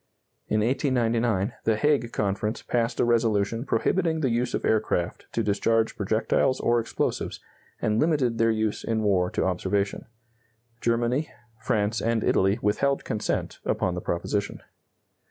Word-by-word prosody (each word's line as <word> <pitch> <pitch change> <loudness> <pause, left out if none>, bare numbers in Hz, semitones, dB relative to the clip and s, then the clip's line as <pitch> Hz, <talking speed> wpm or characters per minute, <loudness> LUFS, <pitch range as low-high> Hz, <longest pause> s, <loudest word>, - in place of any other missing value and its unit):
In 110 - +1
1899 120 -4 +1
the 110 - +3
Hague 135 -1 +1
Conference 105 +2 -2
passed 115 -1 -1
a - - +4
resolution 115 0 +1
prohibiting 160 +7 +1
the 130 -5 +1
use 120 +1 0
of - - -3
aircraft 105 -5 0
to 115 - 0
discharge 110 +2 +1
projectiles 110 +5 +1
or 120 0 +2
explosives, 115 - -2 0.4
and 110 +1 +1
limited 140 -8 +1
their 115 0 +4
use 110 -1 -1
in 110 -1 -1
war 95 -3 +2
to - - -1
observation. 95 +2 -1 0.7
Germany, 120 +5 +1 0.3
France, 105 +1 0
and 115 -1 0
Italy 95 +2 +2
withheld 135 +7 +1
consent 105 - -2
upon 90 - 0
the 90 - -4
proposition. 100 +4 -2
115 Hz, 135 wpm, -26 LUFS, 105-120 Hz, 0.7 s, a